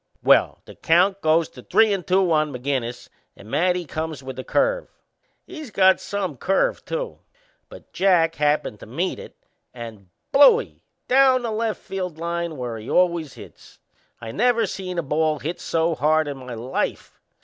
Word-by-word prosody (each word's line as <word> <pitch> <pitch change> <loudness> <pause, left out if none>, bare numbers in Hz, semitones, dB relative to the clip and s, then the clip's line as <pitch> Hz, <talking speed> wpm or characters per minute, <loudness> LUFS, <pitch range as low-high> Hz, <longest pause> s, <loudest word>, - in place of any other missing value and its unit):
Well, - - +3
the - - -12
count 190 +4 +2
goes 160 +1 +3
to 125 - -13
three 215 - +3
and 190 -3 -4
two 185 -1 +2
on 155 -1 +2
McInnes 125 -2 -3 0.3
and 105 - -13
Matty 180 +1 +1
comes 155 -3 -5
with 130 -1 -7
a - - -4
curve - - 0 0.6
he's 310 -7 -9
got 190 -2 +4
some 190 -8 -4
curve 190 +9 0
too; - - -4 0.5
but - - -15
Jack 175 -4 +3
happened 150 -8 0
to - - -12
meet - - -3
it - - -11 0.4
and 110 -6 -9 0.2
Blooie! 445 - +5 0.3
Down 260 -1 +4
the 230 - -2
left 220 0 -2
foul 190 -1 -4
line 170 0 -4
where 120 -3 -5
he 110 - -9
always 170 -5 +1
hits! - - -14 0.4
I 115 -1 -7
never 235 - +2
seen 185 -2 -6
a 170 - 0
ball 155 +2 0
hit 165 +5 -5
so 165 0 0
hard 155 +2 +2
in 140 -1 -5
my 125 -2 -8
life. 120 +4 -4
165 Hz, 170 wpm, -23 LUFS, 140-195 Hz, 0.6 s, Blooie